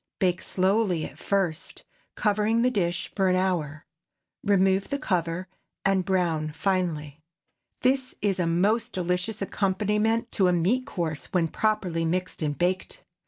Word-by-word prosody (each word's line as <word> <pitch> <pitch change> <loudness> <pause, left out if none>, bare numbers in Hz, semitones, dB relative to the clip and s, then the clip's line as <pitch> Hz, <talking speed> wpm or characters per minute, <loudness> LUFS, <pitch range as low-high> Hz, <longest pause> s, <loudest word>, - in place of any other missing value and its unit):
Bake 180 -2 +1
slowly 190 -3 +1
at - - -10
first, 185 -4 -1 0.3
covering 215 +2 +2
the 250 - +3
dish, 175 -6 -1
for 195 -2 +2
an 185 - +3
hour. 170 -5 -1 0.6
Remove 195 -1 +3
the 280 - 0
cover, 180 - -1 0.4
and 195 -1 +3
brown 170 -5 0
finely. 160 -5 -1 0.6
This 260 0 +1
is 200 -3 0
a 175 - +1
most 210 +8 +1
delicious 180 +4 -1
accompaniment 210 +4 0
to 190 -3 +3
a 180 - +3
meat 200 +10 +1
course, 160 -5 -3
when 170 -3 +1
properly 190 -5 0
mixed 180 +2 -2
and 145 -2 -1
baked. 185 - -1
185 Hz, 140 wpm, -26 LUFS, 170-210 Hz, 0.6 s, the